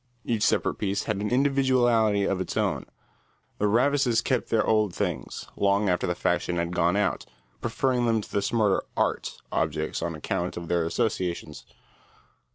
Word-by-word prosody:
Each 115 -3 -1
separate - - +1
piece 100 -1 -1
had 105 -3 -2
an 105 +1 -2
individuality 125 -6 +3
of 95 -1 0
its - - -4
own. - - 0 0.7
The 105 - +2
Ravises 120 +1 +2
kept - - 0
their 110 -2 +2
old 105 -4 +2
things, 90 -10 -3
long 100 0 +2
after 90 -1 +1
the 90 - -1
fashion 85 0 0
had 85 +1 -1
gone 85 +1 +2
out, 100 -4 0 0.3
preferring 120 +1 0
them 115 -1 +2
to 105 - -9
the 100 - 0
smarter 105 -2 +2 0.2
"art" - - -1
objects - - -1
on 85 -1 -2
account 85 +3 -3
of 85 -1 -6
their 85 -2 +1
associations. 85 - -2
105 Hz, 165 wpm, -26 LUFS, 90-115 Hz, 0.7 s, individuality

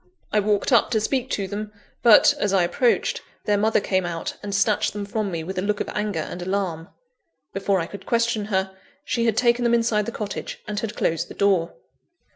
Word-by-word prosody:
I 210 - +4
walked 205 +3 +1
up 235 -4 +5
to 225 - +1
speak 255 +4 -1
to 200 -8 -2
them; 210 +2 -5 0.3
but, 230 -3 +7
as 205 -1 0
I 190 -2 +4
approached, 235 +8 +1 0.2
their 210 - +2
mother 215 +2 +2
came 190 -2 0
out, 170 -1 -4
and 205 - -5
snatched 205 +1 +2
them 205 -1 -4
from 215 0 -2
me 165 -3 -4
with 185 +2 -4
a - - 0
look 205 +1 -1
of - - -3
anger 210 -6 -2
and 180 - -7
alarm. 180 -3 -2 0.7
Before 195 0 +1
I 165 - -1
could 200 - -10
question 230 -2 +1
her, 190 -2 -1 0.3
she 235 -4 0
had 225 -2 +1
taken 240 0 +3
them 235 0 +3
inside 225 -3 +1
the - - -2
cottage, 205 -3 -5
and 210 0 -2
had 215 -1 -4
closed 165 +1 0
the - - -11
door. 190 -4 +1
205 Hz, 215 wpm, -23 LUFS, 190-220 Hz, 0.7 s, but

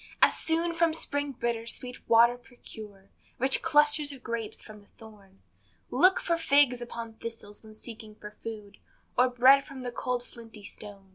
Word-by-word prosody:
As - - +5
soon 335 +1 0
from 330 -1 +2
spring 285 -3 -2
bitter, 230 -2 -3
sweet 250 +1 -8
water 235 +1 +6
procure, 215 -5 -13 0.3
Rich 265 +2 +3
clusters 295 -1 +3
of 265 -3 -11
grapes 225 -2 -4
from 215 -1 -12
the 205 - -23
thorn; 205 -3 -17 0.5
Look 370 +1 +4
for 340 -1 0
figs 280 -6 +4
upon 230 -2 -7
thistles, 225 -3 -8
when 215 -1 -14
seeking 220 -1 -10
for 210 -1 -10
food, 210 -2 -9 0.4
Or 255 +1 +4
bread 260 +3 +6
from 270 -2 -10
the 245 - -4
cold 250 0 -2
flinty 225 -4 -13
stone. 200 -1 -9
235 Hz, 165 wpm, -28 LUFS, 215-275 Hz, 0.5 s, water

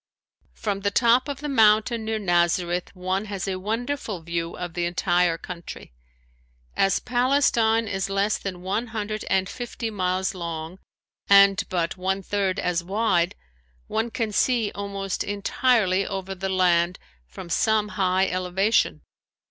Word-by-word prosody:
From 205 -3 -2
the 200 +1 0
top 235 +5 +3
of 285 -1 -5
the 300 - -3
mountain 220 -2 +3
near 220 0 -1
Nazareth 175 -2 +1
one 185 +2 -2
has 200 -2 -4
a 190 -1 -2
wonderful 225 +1 -3
view 170 0 -3
of 175 -2 -5
the 175 0 -1
entire 175 -1 +1
country. 170 - -9 0.8
As 195 - +2
Palestine 240 -3 +2
is 195 -1 -2
less 200 +2 +1
than 180 -2 -6
one 205 +6 -1
hundred 215 -1 -4
and 190 0 +2
fifty 240 0 -5
miles 185 -2 -1
long 170 0 -6 0.5
and 200 -1 +6
but 170 -1 -1
one 190 +1 -1
third 195 -1 -1
as 175 -1 -1
wide 190 -2 +1 0.5
one 225 +2 -1
can 225 -2 -2
see 230 0 +1
almost 200 -1 -3
entirely 205 -1 +1
over 195 -1 -4
the 190 +1 -4
land 180 -2 +2 0.3
from 65 - -10
some 210 +4 +1
high 185 -1 +1
elevation. 185 +4 +1
195 Hz, 140 wpm, -24 LUFS, 180-220 Hz, 0.8 s, and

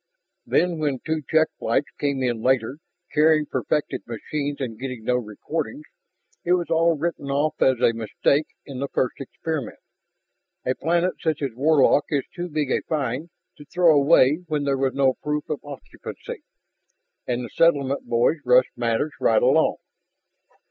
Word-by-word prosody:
"Then 175 -2 +1
when 145 -3 0
two 160 -1 -1
check 160 0 +3
flights 145 - 0
came 140 -2 -1
in 120 -3 -1
later, 130 +1 +1 0.4
carrying 155 0 +4
perfected 150 0 -2
machines 140 +5 -4
and 115 -5 -5
getting 125 -3 -5
no 125 +2 +1
recordings, 150 - -5 0.6
it 175 - +2
was 175 -2 0
all 165 0 +3
written 155 -2 -3
off 145 +2 0
as 130 -2 +4
a 115 - +4
mistake 115 +6 0 0.2
in 135 -3 -7
the 140 - -2
first 130 -2 -1
experiment. 150 +1 -5 0.9
A 130 - +1
planet 170 +5 0
such 155 -3 -1
as 135 - -1
Warlock 145 +2 +4
is 140 -3 0
too 175 -1 -4
big 150 -3 -1
a - - +1
find 145 +1 -2 0.3
to 145 - -13
throw 170 +1 +4
away 145 +2 +4
when 150 -2 -1
there 140 -1 +1
was 135 -1 0
no 135 -1 +3
proof 150 0 -2
of 150 - -3
occupancy. 140 -4 -9 0.9
And 125 0 -1
the - - -9
settlement 140 -6 +2
boys 120 +7 +2
rushed 125 0 +4
matters 120 +5 0
right - - +3
along." - - +4
145 Hz, 160 wpm, -23 LUFS, 130-160 Hz, 0.9 s, carrying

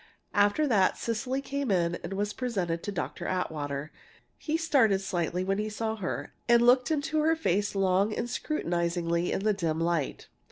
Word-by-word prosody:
After 205 +9 +3
that, 205 -9 +3
Cecily 250 +4 -2
came 280 -2 -3
in 175 -3 +1
and 170 - -4
was 205 +1 -1
presented 185 -10 -2
to 205 - -4
Dr. 195 - -4
Atwater. 150 -5 -3 0.4
He 315 +1 -2
started 265 - +3
slightly 180 -1 -1
when 195 +2 0
he 215 0 -1
saw 220 +1 -2
her, 185 -4 -4 0.2
and 235 0 +6
looked 250 +3 +5
into 310 0 0
her 320 +2 +3
face 205 - 0
long 195 +2 +2
and 220 - -2
scrutinizingly 170 - -1
in - - -1
the 215 0 +3
dim 165 -5 -1
light. 165 -4 -1
200 Hz, 170 wpm, -28 LUFS, 175-245 Hz, 0.4 s, and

